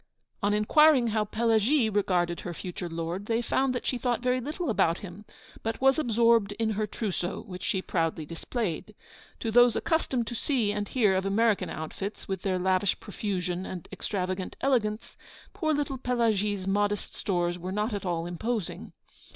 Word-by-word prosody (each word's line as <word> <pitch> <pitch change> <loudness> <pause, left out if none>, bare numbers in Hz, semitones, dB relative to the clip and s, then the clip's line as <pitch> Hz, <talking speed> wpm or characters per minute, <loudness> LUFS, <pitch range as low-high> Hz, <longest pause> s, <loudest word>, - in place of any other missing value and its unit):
On 205 0 +2
inquiring 250 +4 +5
how 215 -1 +1
Pelagie 225 +4 +2
regarded 180 -5 +1
her 175 -2 -6
future 180 +1 -5
lord, 170 +4 -4
they 230 0 +1
found 255 +2 +1
that 245 - -3
she 250 - 0
thought 245 0 0
very 255 0 +2
little 300 +2 -2
about 170 -5 +2
him, 195 +3 -10 0.4
but 225 0 -3
was 270 +2 +4
absorbed 230 -5 +3
in 220 +1 -1
her 215 0 -1
trousseau, 195 -4 -3
which 180 -3 -9
she 190 0 -1
proudly 165 -2 -1
displayed. 190 - -4 0.5
To 225 - -1
those 245 +1 +6
accustomed 270 -7 0
to 225 - -5
see 235 -3 0
and 205 0 -2
hear 215 -5 +3
of 190 +1 0
American 215 +1 +2
outfits, 195 +6 -6
with 190 -2 -3
their 190 -2 0
lavish 185 +1 +1
profusion 185 -3 -3
and 180 -3 -7
extravagant 185 -2 -3
elegance, 225 -5 0 0.4
poor 315 -6 0
little 285 -3 -1
Pelagie's 215 -6 +1
modest 205 +1 0
stores 175 -3 -1
were 180 +2 -5
not 210 +3 -1
at 200 - -3
all 170 -3 -1
imposing. 210 +3 -3
210 Hz, 165 wpm, -28 LUFS, 185-235 Hz, 0.5 s, those